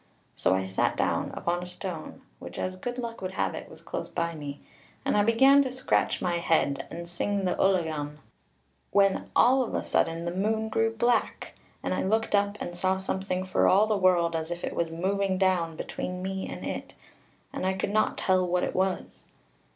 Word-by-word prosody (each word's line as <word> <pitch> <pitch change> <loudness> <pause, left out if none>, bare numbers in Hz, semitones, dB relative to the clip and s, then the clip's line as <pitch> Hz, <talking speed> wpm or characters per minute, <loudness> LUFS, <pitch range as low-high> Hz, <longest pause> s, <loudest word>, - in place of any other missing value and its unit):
So 95 - +2
I 95 0 -1
sat 95 0 0
down - - 0
upon 175 +1 -1
a 180 - -6
stone 180 -3 -7 0.2
which, - - -9
as 185 0 -2
good 245 +6 -5
luck 235 -3 -5
would 185 0 -4
have - - 0
it, - - -7
was - - -14
close - - -5
by 170 -1 -2
me, 145 -2 -7 0.5
and - - +2
I 205 - +5
began 265 +6 +6
to 260 -2 -1
scratch 260 0 0
my 175 -1 +1
head, 160 -4 +1
and 170 +1 -7
sing 195 +3 -1
the 180 - +2
Ullagone 160 -6 +1 0.7
when 195 -1 +2
all 260 +2 +5
of 245 - -2
a - - -1
sudden 165 +1 0
the 170 - -1
moon 220 +4 0
grew 225 +1 +1
black, 235 0 0 0.3
and - - -1
I - - 0
looked 220 +3 0
up, 205 0 +2
and 175 - -5
saw 185 +2 +1
something 190 -1 -2
for 185 - +2
all 200 +3 +5
the 215 -1 +1
world 180 -3 +3
as 160 0 -2
if 175 0 -5
it - - -2
was 170 -1 0
moving 190 +3 0
down 180 -4 +1
between 180 +3 -5
me 190 0 -3
and - - -6
it, - - -5 0.6
and - - -4
I 190 +1 +2
could 190 +1 -2
not 215 +1 +2
tell 185 -1 +2
what 180 0 +1
it - - -1
was. 190 0 -2
185 Hz, 205 wpm, -28 LUFS, 170-205 Hz, 0.7 s, began